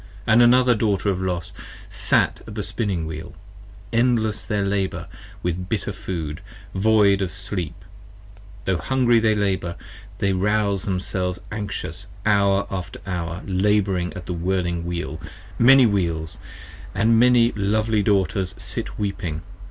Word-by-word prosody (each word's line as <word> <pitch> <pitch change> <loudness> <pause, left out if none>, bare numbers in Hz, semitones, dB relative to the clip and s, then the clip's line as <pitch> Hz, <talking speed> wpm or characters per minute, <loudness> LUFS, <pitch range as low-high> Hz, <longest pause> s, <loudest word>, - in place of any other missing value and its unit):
68 110 - +3
And 120 - +7
another 125 +1 +6
Daughter 105 -3 +1
of 95 -1 -1
Los 90 -3 -2 0.4
sat - - +1
at - - -8
the - - -2
Spinning 95 -7 -1
Wheel: 80 +1 -7 0.6
30 115 - 0
Endless 115 -3 +1
their 105 -2 -1
labour, 95 -3 -1 0.4
with 90 +1 -2
bitter 110 -4 -2
food, 80 -5 -5 0.3
void 100 -1 +4
of 95 - -1
sleep, 95 -4 -3 0.9
Tho' 95 -2 +1
hungry 120 +6 +3
they 110 -1 +3
labour: 95 -4 -1 0.4
they 100 -1 +1
rouze 100 0 +1
themselves 90 -1 -1
anxious 105 -1 -5 0.2
Hour 100 -1 +3
after 95 -2 -5
hour 85 -1 -4
labouring 95 -2 +1
at 90 - -7
the 90 - -3
whirling 85 -1 -1
Wheel, 85 -2 -4 0.4
Many 130 +2 +7
Wheels, 85 -7 -1 0.3
& - - -16
as 100 - +1
many 120 +1 +5
lovely 110 +1 +1
Daughters 95 -2 +1
sit - - -5
weeping. 90 -5 -3
100 Hz, 140 wpm, -23 LUFS, 90-110 Hz, 0.9 s, And